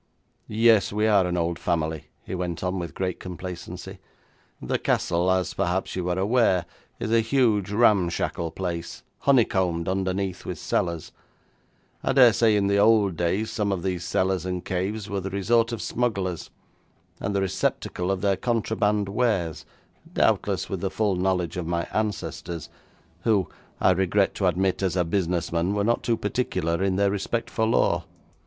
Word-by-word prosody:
'Yes, 110 -1 +4
we 105 +1 +1
are 100 -4 +4
an 90 0 -1
old 85 0 -1
family,' 80 -3 -1 0.2
he - - -7
went 90 -2 -3
on 90 +1 -1
with 85 -1 -6
great 95 -1 -2
complacency. 90 -1 -7 0.6
'The - - -2
castle, 85 +2 +1
as 95 -1 +1
perhaps 95 0 -1
you 90 -1 -2
are 90 - 0
aware, 100 -2 +2 0.3
is 110 - -3
a 115 - +5
huge, 115 -4 +2
ramshackle 95 -6 +2
place, 85 -1 -5 0.2
honeycombed 95 -10 +2
underneath 95 0 -1
with - - -5
cellars. 85 -2 -2 0.9
I - - +1
dare 125 -4 +7
say 110 -1 +3
in 100 -1 +2
the 100 0 +2
old 105 -3 +4
days 90 +6 -1
some 105 -2 -1
of 90 -3 -2
these 90 -2 -2
cellars 95 0 0
and 90 -1 -4
caves 95 +3 -2
were 100 -2 -2
the 95 - -4
resort 115 +5 +2
of 115 - -4
smugglers, 100 -8 -2 0.7
and 100 0 -2
the 100 - +2
receptacle 90 -1 -1
of 95 -1 0
their 100 -2 +2
contraband 105 -3 0
wares, 100 -8 -1 0.4
doubtless - - +1
with - - -4
the - - 0
full 105 -3 0
knowledge 90 -1 0
of 85 -2 -3
my 85 0 0
ancestors, 95 -6 -3 0.5
who, 105 -5 +2 0.3
I - - +4
regret 95 +2 +2
to 95 - 0
admit, 95 +2 +1
as 95 -2 0
a 90 -2 +2
business 85 -1 -1
man, 85 +4 0
were 100 - +1
not 120 +3 +1
too 115 -1 0
particular 95 -6 -1
in 95 -1 +1
their 100 0 +2
respect 115 +4 -2
for 110 -1 +1
law. 115 - +2
95 Hz, 165 wpm, -25 LUFS, 90-105 Hz, 0.9 s, dare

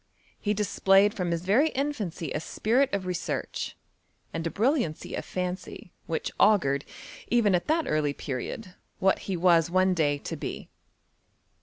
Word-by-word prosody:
Hedisplayed 205 -1 +3
from 180 -6 -2
his 170 +1 -2
very 250 +12 +4
infancy 225 - -3
aspiritof 220 - 0
research, 180 -2 -3 0.6
and 165 0 -2
a - - -1
brilliancy 230 - 0
of - - -3
fancy, 180 0 -5 0.2
which - - -2
augured, 140 -10 +4 0.4
even 230 -5 +3
at 175 - +1
that 320 +1 +2
early 150 -2 +1
period, 145 - -5 0.2
what 190 0 +1
be 190 -2 -1
was 170 -2 +4
one 185 +1 +3
day 150 -4 +1
to - - -6
be. - - -6
185 Hz, 135 wpm, -27 LUFS, 165-215 Hz, 0.6 s, very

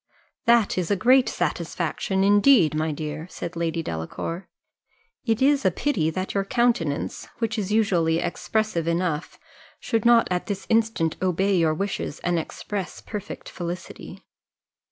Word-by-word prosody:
"That 235 -5 +4
is 175 - -2
a 205 - +3
great 250 +6 +4
satisfaction, 190 0 -1
indeed, 205 - +5
my 155 +1 0
dear," 155 +2 -5
said 170 - -6
Lady 165 0 -1
Delacour. 120 - -5 0.8
"It 225 +3 +2
is 280 0 +4
a 190 - +5
pity 185 - 0
that 185 +4 -3
your 195 - +1
countenance, 210 - 0
which 230 -1 -1
is 200 -1 -3
usually 175 -7 +2
expressive 175 0 -1
enough, 170 -2 -1 0.4
should 225 -3 -1
not 235 -1 +5
at 180 -1 -1
this 200 -2 -4
instant 225 -8 +1
obey 190 +2 +1
your 160 -3 +2
wishes 195 -4 -3
and 175 -1 +1
express 195 +4 -5
perfect 210 -3 -7
felicity. 175 0 -7
185 Hz, 140 wpm, -24 LUFS, 165-220 Hz, 0.8 s, indeed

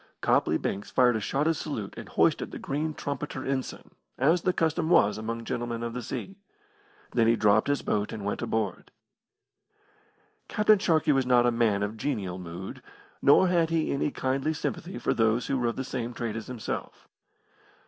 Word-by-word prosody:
Copley - - +2
Banks 100 +1 -3
fired 125 -2 +4
a - - 0
shotted 140 +9 +1
salute 145 -10 -5
and - - -9
hoisted - - +2
the - - -7
green 150 +2 -3
trumpeter 140 -1 -4
ensign, 135 -1 -3 0.3
as 160 +7 +3
the 185 - +2
custom 160 -1 0
was 105 -11 +5
among 115 +1 -4
gentlemen 120 -1 -3
of 115 0 -3
the 125 - -4
sea. 190 - -6 0.7
Then 115 -2 +3
he 115 - +5
dropped 105 -1 +3
his 145 0 0
boat 105 -1 -1
and 105 -3 -6
went 100 - -2
aboard. 105 -5 -2 1.6
Captain 210 -1 +4
Sharkey 160 -6 +2
was 135 -2 +2
not 120 -1 +5
a 120 - +4
man 110 -4 +2
of 105 - -1
a - - -12
genial 100 -8 -3
mood, 90 +1 -7 0.4
nor 145 +7 +6
had 170 -2 +2
he 165 -1 0
any 140 +1 0
kindly 135 +3 -1
sympathy 175 +5 -4
for - - 0
those 115 +1 +2
who 135 - 0
were 120 - +1
of 115 - -1
the 130 - -3
same 120 -2 -4
trade 115 -2 -3
as 110 - -6
himself. 125 -4 -6
125 Hz, 185 wpm, -28 LUFS, 110-150 Hz, 1.6 s, nor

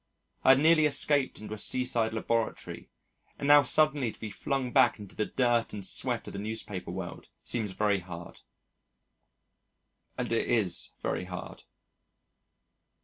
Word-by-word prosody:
I 130 - +8
had - - 0
nearly 155 0 +5
escaped 145 -2 +2
into 105 0 -7
a 110 - -6
seaside 120 -3 +1
laboratory, 115 0 -2 0.5
and 140 - -3
now 145 0 +8
suddenly 145 -3 +2
to - - -19
be 110 - -6
flung 135 +3 -2
back 130 -3 +4
into 100 -3 -11
the 110 - -1
dirt 120 -2 +1
and 100 -2 -4
sweat - - -1
of - - -8
the 100 - -5
newspaper 105 -3 -4
world 90 0 -7
seems 110 -5 -2
very 105 0 +1
hard, 85 -1 -10 1.8
and 125 -2 -3
it 115 - +1
is 110 -7 0
very 90 - -2
hard. 90 -2 -8
115 Hz, 145 wpm, -29 LUFS, 100-130 Hz, 1.8 s, I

